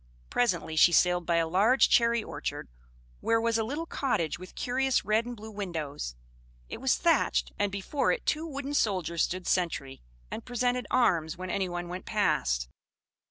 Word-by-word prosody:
Presently 175 -9 0
she 165 +2 +6
sailed 180 +1 +3
by 170 - +2
a 165 -1 +2
large 210 +10 +4
cherry 235 -1 +3
orchard, - - -5 0.5
where 230 0 +2
was 230 0 +1
a - - +1
little 290 +9 -3
cottage 210 - -1
with 185 - -11
curious 260 +1 0
red 220 +2 +1
and 245 -1 -6
blue 220 +1 -9
windows; 160 - -5 0.5
it - - -7
was 265 -1 +3
thatched, 335 -1 +2
and 205 -1 +1
before 200 +8 0
it - - -2
two 315 +2 0
wooden 280 -1 -5
soldiers 180 - 0
stood 185 0 -1
sentry, 160 -7 -1 0.3
and 225 - -5
presented 245 +1 -1
arms 170 -11 +2
when 185 0 -5
anyone 175 -2 -2
went 180 +1 -6
past. 65 - +1
205 Hz, 165 wpm, -29 LUFS, 175-245 Hz, 0.5 s, she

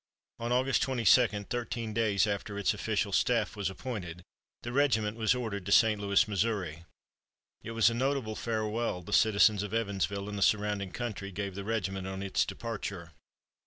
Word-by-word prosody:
On 120 +1 -3
August 130 +2 +2
22, 125 -1 +4 0.2
thirteen 115 0 -4
days 105 -3 +2
after 100 0 -3
its 100 - +1
official 105 -2 -1
staff 115 +1 +1
was 100 -3 -2
appointed, 95 -6 -6 0.4
the 120 - -4
regiment 110 -6 +2
was 115 +1 +2
ordered 110 -6 -3
to - - -2
St. 110 -1 +5
Louis, 100 +1 +3
Missouri. 95 -6 -2 0.8
It 115 - -7
was 115 0 +4
a - - -2
notable 130 -3 -1
farewell 110 -4 -2
the - - -7
citizens 105 -1 +4
of 105 +1 -4
Evansville 100 -2 -1
and 105 -1 -4
the - - -5
surrounding 105 -1 +1
country 105 -5 -5
gave 100 +1 -4
the 100 +1 -6
regiment 95 -3 -2
on 95 0 -5
its 100 - +1
departure. 100 -7 -6
105 Hz, 165 wpm, -30 LUFS, 100-115 Hz, 0.8 s, St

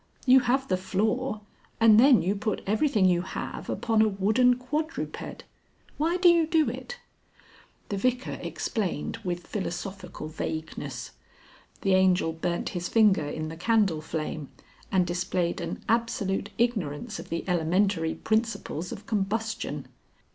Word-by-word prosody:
"You 260 0 +8
have 260 +2 +1
the 185 - +1
floor, 215 +5 -1 0.4
and 225 -1 +7
then 260 -1 +6
you 190 +3 +1
put 210 0 -2
everything 215 0 +2
you 175 -2 +4
have 190 - -6
upon 225 -2 +1
a 220 - +5
wooden 215 +5 +3
quadruped. 300 +6 -4 0.6
Why 335 +4 +2
do 365 0 +4
you 340 -2 +5
do 320 -2 +3
it?" 485 - -7 0.9
The 200 - -2
Vicar 250 +4 -1
explained 200 -2 -3
with 175 -5 -4
philosophical 185 -3 -5
vagueness. 155 0 -5 0.7
The 195 - +2
Angel 185 -3 +3
burnt 170 +2 -2
his 175 -1 -4
finger 210 -9 +4
in 155 +1 -4
the 160 - -7
candle 200 -5 +2
flame 155 -2 -4 0.4
and 185 -2 +3
displayed 175 0 -1
an 170 0 -5
absolute 225 -4 0
ignorance 220 -4 -1
of - - -9
the 165 - -2
elementary 175 0 +1
principles 220 -6 -1
of 200 - -8
combustion. 220 +2 -2
200 Hz, 135 wpm, -27 LUFS, 175-230 Hz, 0.9 s, You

